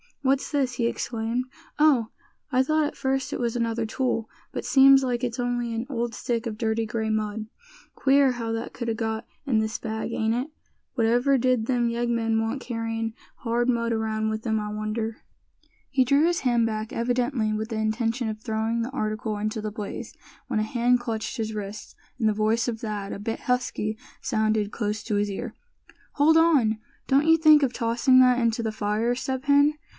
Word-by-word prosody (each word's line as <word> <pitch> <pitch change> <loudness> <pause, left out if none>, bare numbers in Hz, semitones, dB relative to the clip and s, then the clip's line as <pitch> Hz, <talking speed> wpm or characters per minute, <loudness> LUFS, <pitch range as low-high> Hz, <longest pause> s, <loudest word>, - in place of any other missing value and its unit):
what's 270 0 +1
this?" 275 -4 +1
he 240 -1 -1
exclaimed; 235 +1 -2 0.3
"Oh! 285 -7 +4 0.4
I 255 0 +4
thought 310 +2 +2
at 290 - -4
first 270 0 -1
it - - -3
was 235 -1 -1
another 230 -1 0
tool; 230 -1 -1 0.2
but - - -5
seems 270 -1 +7
like 245 -2 -1
it's 245 0 -2
only 245 -1 -1
an 225 +2 -2
old 235 -3 -2
stick 235 -1 -2
of 215 -2 -5
dirty 225 0 0
gray 220 0 -2
mud. 215 0 -2 0.5
Queer 270 -1 +4
how 230 -2 -4
that 225 +1 -3
could 235 - -5
a - - +1
got 220 0 -3 0.2
in 245 -6 +2
this 220 0 -1
bag, 220 0 -4
ain't 220 0 0
it? 250 +4 -1 0.5
Whatever 245 +4 +3
did 255 -2 +2
them 240 -1 +1
yeggmen 235 -1 0
want 225 +4 -2
carryin' 225 -2 -3 0.2
hard 240 0 0
mud 235 -1 +1
around 220 -1 -1
with 220 +1 -4
'em, 220 -1 +1
I 210 0 -4
wonder?" 215 +1 -3 0.7
He 265 -2 +3
drew 280 +5 +3
his 345 0 +1
hand 240 -3 +2
back, 215 -1 -3
evidently 240 -1 0
with 215 +1 -3
the 225 - -3
intention 225 +2 0
of 215 0 -5
throwing 225 +1 -1
the 245 - -5
article 215 -4 -2
into 215 +1 -2
the 215 0 -4
blaze, 210 -2 -6 0.3
when - - 0
a - - +1
hand 245 +2 +2
clutched 225 -2 -4
his 220 -1 -2
wrist, 210 0 -7 0.2
and 220 -3 +3
the - - +1
voice 220 +3 +1
of 230 -2 -2
Thad, 210 -3 -4
a - - -5
bit 225 +2 -4
husky, 250 -4 -1 0.2
sounded 215 -3 0
close 210 -1 -2
to 215 - -2
his 205 0 +1
ear: 220 +3 -5 0.6
"Hold 310 +3 +5
on! 285 -10 +4 0.3
don't 280 +3 +3
you 325 0 +6
think 310 -2 +7
of 255 -2 +1
tossing 240 +2 +3
that 250 -1 +5
into 230 -1 +1
the 220 - -1
fire, 215 +3 0
Step 260 +1 -3
Hen! 285 +1 +4
230 Hz, 195 wpm, -25 LUFS, 220-250 Hz, 0.7 s, seems